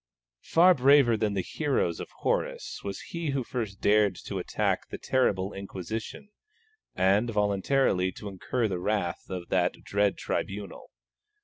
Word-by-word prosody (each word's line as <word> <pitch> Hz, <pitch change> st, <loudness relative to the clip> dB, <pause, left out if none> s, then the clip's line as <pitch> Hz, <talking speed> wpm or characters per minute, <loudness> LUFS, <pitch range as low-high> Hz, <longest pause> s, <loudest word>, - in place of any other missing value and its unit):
Braver 145 Hz, -5 st, +7 dB
far 115 Hz, -2 st, +2 dB
than 105 Hz, -2 st, 0 dB
the 95 Hz, -, 0 dB
heroes 135 Hz, -, -1 dB
of -, -, -6 dB
Horace -, -, -2 dB
was 100 Hz, -1 st, -5 dB
he 170 Hz, -2 st, -4 dB
who 135 Hz, -2 st, 0 dB
first 110 Hz, -5 st, -4 dB
dared 105 Hz, -2 st, +4 dB
to -, -, -3 dB
attack -, -, -1 dB
the -, -, -6 dB
terrible 100 Hz, -7 st, +1 dB
Inquisition, 100 Hz, -, -6 dB, 0.7 s
and 100 Hz, +5 st, +3 dB
voluntarily 105 Hz, -1 st, +1 dB
to 105 Hz, -, -8 dB
incur 110 Hz, +5 st, -1 dB
the 95 Hz, -3 st, -3 dB
wrath 100 Hz, -2 st, -2 dB
of 90 Hz, -2 st, -5 dB
that 90 Hz, -1 st, +2 dB
dread 100 Hz, 0 st, +1 dB
tribunal. 100 Hz, +1 st, -4 dB
105 Hz, 140 wpm, -28 LUFS, 95-125 Hz, 0.7 s, Braver